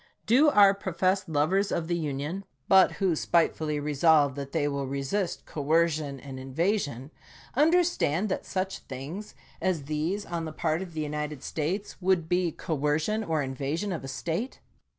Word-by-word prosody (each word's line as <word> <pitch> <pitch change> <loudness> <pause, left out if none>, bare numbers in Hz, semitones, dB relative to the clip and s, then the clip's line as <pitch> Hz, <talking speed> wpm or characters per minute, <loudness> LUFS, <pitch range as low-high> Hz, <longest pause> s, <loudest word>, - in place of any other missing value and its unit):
Do 270 +7 +5
our 200 -6 +7
professed 190 -1 0
lovers 180 +7 +1
of 165 -2 -1
the 175 - 0
Union, 155 +4 -3 0.2
but 190 -1 +6
who 190 -4 +1
spitefully 155 -2 +1
re 150 +1 -2
solve 145 -1 +4
that 140 0 -6
they 155 -3 +1
will 140 -1 -2
resist 140 +8 -2
coercion 155 -2 0
and 135 -1 -8
invasion, 145 - -1 0.4
under 325 +6 +5
stand 205 - 0
that 190 - -2
such 190 0 -3
things 150 +11 -8 0.3
as 180 -6 0
these 155 +8 -2
on 170 -1 -3
the 155 - -6
part 160 +1 0
of 180 -3 -7
the 155 - -1
United 150 -2 -4
States 185 +7 -3
would 180 -3 +2
be 180 0 +1
coercion 155 +9 -1
or 160 -6 0
invasion 140 +9 -3
of 165 -6 -4
a - - -6
State 165 - -3
160 Hz, 165 wpm, -28 LUFS, 145-190 Hz, 0.4 s, our